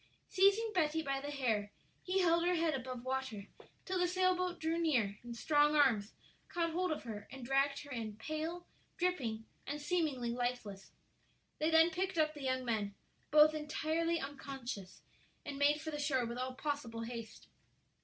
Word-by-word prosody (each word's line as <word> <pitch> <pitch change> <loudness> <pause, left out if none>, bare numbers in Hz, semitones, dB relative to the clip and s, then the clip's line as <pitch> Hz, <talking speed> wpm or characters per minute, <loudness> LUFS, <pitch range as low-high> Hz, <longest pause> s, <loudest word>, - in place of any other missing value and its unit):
Seizing 400 +4 +4
Betty 320 -3 +1
by 275 -2 -1
the 285 - -5
hair, 225 -8 0 0.3
he 375 +1 +1
held 340 -1 +4
her 355 +1 +3
head 325 -1 +2
above 255 -2 -5
water 260 -6 -2 0.4
till 375 -1 -1
the 360 - +3
sailboat 365 -1 +1
drew 325 +1 0
near 235 -11 +1
and 235 -1 -7
strong 295 +4 +4
arms 235 -8 +3 0.4
caught 335 -1 0
hold 360 +1 0
of 310 - -3
her 215 -4 -7
and 265 -2 -8
dragged 275 +2 +2
her 285 - -12
in, 225 -4 -4
pale, 315 +8 -4 0.3
dripping, 255 -12 -1 0.2
and 290 +2 -3
seemingly 295 -7 0
lifeless. 240 -5 -3 0.7
They 310 - +2
then 325 +1 +6
picked 375 +2 -2
up 310 -1 +3
the 295 - -9
young 260 -1 -1
men, 210 -4 -1 0.3
both 305 +1 +7
entirely 315 +2 0
unconscious, 270 -8 -6 0.4
and 280 -1 -5
made 290 +1 +4
for 315 0 -5
the 295 - -4
shore 275 -4 +1
with 235 +1 -4
all 255 0 -3
possible 270 -5 -3
haste. 230 -1 -7
285 Hz, 170 wpm, -35 LUFS, 245-330 Hz, 0.7 s, both